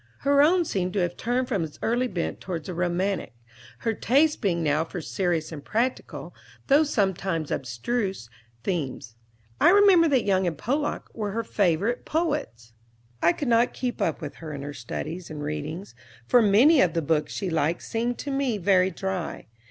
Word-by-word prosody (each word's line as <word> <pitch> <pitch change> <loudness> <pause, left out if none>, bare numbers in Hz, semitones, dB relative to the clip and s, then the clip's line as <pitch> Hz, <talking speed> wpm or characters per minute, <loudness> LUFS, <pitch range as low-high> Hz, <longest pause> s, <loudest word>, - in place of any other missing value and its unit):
Her 280 0 +4
own 345 +4 +4
seemed 185 - -2
to 205 - 0
have 175 0 -1
turned 245 +2 -1
from 200 -9 0
its 155 -2 -7
early 240 +3 +1
bent 175 -7 -4
toward 170 -5 -5
the 185 - -5
romantic, 180 -3 -1 0.5
her 225 - 0
taste 290 +8 +2
being 175 -6 0
now 150 +1 +2
for 175 +2 -6
serious 170 -1 -1
and 150 -3 -7
practical, 240 +4 -2 0.3
though 280 +2 +5
sometimes 190 - -1
abstruse, 145 - -2 0.4
themes. 135 - -3 0.4
I - - +6
remember 385 -3 +6
that 270 -5 +2
Young 190 -2 +2
and 165 -3 -2
Pollock 285 - -2
were 210 -3 -3
her 230 +1 -1
favorite 205 +3 0
poets. 295 - -2 0.5
I 170 - +5
could 280 +10 -4
not 235 +1 +3
keep 250 -2 -3
up 165 0 0
with 150 -2 -7
her 160 -2 -8
in 140 -1 -6
her 145 +1 -6
studies 160 +8 -6
and 150 -1 -6
readings, 155 +6 -5 0.3
for 245 - +5
many 235 +9 +6
of 170 -4 +3
the 165 - 0
books 150 0 0
she 190 -3 -3
liked 160 +1 0
seemed 235 +2 -2
to 285 - -5
me 270 -5 0
very 185 -1 +3
dry. 190 -1 -4
190 Hz, 180 wpm, -26 LUFS, 165-245 Hz, 0.5 s, I